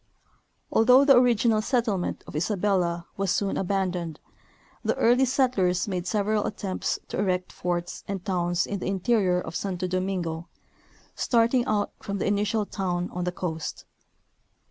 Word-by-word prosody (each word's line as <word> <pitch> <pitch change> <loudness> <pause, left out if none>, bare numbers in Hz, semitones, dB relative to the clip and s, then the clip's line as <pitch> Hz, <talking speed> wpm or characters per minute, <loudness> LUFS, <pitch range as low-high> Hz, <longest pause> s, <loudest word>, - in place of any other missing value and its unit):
Although 250 +4 +6
the 275 -2 +7
original 235 -3 +4
settlement 225 -6 -1
of - - -10
Isabella 175 -1 0
was 195 -1 0
soon 195 +2 0
aban 190 -1 0
doned, 170 -4 -5 0.7
the - - +1
early 245 +3 +4
settlers 240 -10 +1
made 180 -3 -2
s^eral 210 +1 +1
attempts 195 -3 -2
to - - -3
erect 185 -2 0
forts 175 0 -3
and 195 -2 -4
towns 175 -2 0
in 200 - -4
the - - -4
interior 190 -1 +2
of 175 - -6
Santo 185 -2 -2
Domingo, 180 -3 -2 0.7
starting 235 +1 +2
out 205 -1 0
from 200 0 -4
this - - -1
initial 205 +1 +1
town 180 -3 -2
on 180 0 -3
the 180 - 0
coast. 165 -3 -5
195 Hz, 145 wpm, -26 LUFS, 180-215 Hz, 0.7 s, the